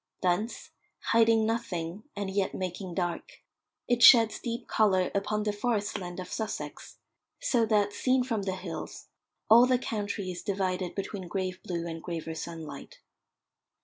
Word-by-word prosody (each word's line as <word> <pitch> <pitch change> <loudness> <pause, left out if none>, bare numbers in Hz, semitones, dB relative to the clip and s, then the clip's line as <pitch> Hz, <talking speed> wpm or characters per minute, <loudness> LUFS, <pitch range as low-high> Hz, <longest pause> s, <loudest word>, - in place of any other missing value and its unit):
Thence, 185 +6 -1 0.4
hiding 225 -1 +5
nothing, 200 -6 -2
and 200 -1 -3
yet 195 0 0
making 185 -1 -4
dark, 175 -2 -4 0.4
it 245 -1 +1
sheds 230 -2 +8
deep 235 0 -4
colour 190 -4 +2
upon 210 +1 0
the 210 -1 0
forest 210 -1 -1
land 175 -1 -6
of 180 0 -7
Sussex, 220 -1 -5 0.4
so 245 - +2
that, 205 -2 +2
seen 255 +3 +2
from 230 -5 -1
the 190 -1 -2
hills, 180 -3 -7 0.4
all 235 +3 +8
the 255 -1 +4
country 205 -5 -3
is 175 - -6
divided 185 -2 -2
between 195 -2 -4
grave 185 0 -3
blue 170 -2 -4
and 165 -1 -5
graver 165 -2 -5
sunlight. 160 -3 -8
200 Hz, 145 wpm, -29 LUFS, 180-225 Hz, 0.4 s, sheds